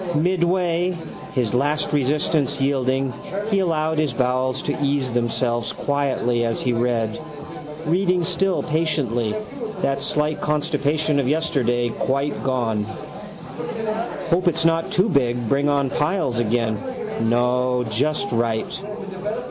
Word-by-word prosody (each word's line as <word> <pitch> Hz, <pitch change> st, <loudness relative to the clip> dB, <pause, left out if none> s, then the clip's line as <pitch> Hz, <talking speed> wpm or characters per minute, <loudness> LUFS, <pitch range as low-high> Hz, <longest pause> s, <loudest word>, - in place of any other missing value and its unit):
Midway, 175 Hz, +1 st, +1 dB, 0.4 s
his 125 Hz, -4 st, +1 dB
last 145 Hz, +5 st, +1 dB
resistance 145 Hz, 0 st, +1 dB
yielding, 135 Hz, -1 st, +1 dB, 0.4 s
he 200 Hz, -, +3 dB
allowed 160 Hz, -3 st, +1 dB
his 150 Hz, -5 st, +1 dB
bowels 130 Hz, +1 st, 0 dB
to -, -, -1 dB
ease 140 Hz, -2 st, +1 dB
themselves 120 Hz, 0 st, 0 dB
quietly 135 Hz, -4 st, 0 dB
as 115 Hz, -1 st, 0 dB
he 125 Hz, -, 0 dB
read, 115 Hz, -2 st, 0 dB, 0.7 s
reading 180 Hz, +2 st, +2 dB
still 185 Hz, +2 st, +1 dB
patiently 150 Hz, -8 st, 0 dB, 0.5 s
that 135 Hz, 0 st, +1 dB
slight 150 Hz, +1 st, 0 dB
constipation 150 Hz, 0 st, +1 dB
of 135 Hz, -, +1 dB
yesterday 130 Hz, -6 st, +1 dB
quite 140 Hz, +5 st, -1 dB
gone. 120 Hz, -5 st, 0 dB, 1.5 s
Hope 180 Hz, +2 st, +3 dB
it's 165 Hz, -1 st, +2 dB
not 165 Hz, 0 st, +2 dB
too 185 Hz, +4 st, +3 dB
big 125 Hz, -, +1 dB
bring 140 Hz, +4 st, +2 dB
on 140 Hz, -2 st, +1 dB
piles 150 Hz, -, 0 dB
again. 115 Hz, -1 st, +1 dB, 0.4 s
No, 125 Hz, +2 st, +2 dB
just 150 Hz, -, 0 dB
right. 115 Hz, +8 st, -1 dB
140 Hz, 115 wpm, -22 LUFS, 120-155 Hz, 1.5 s, he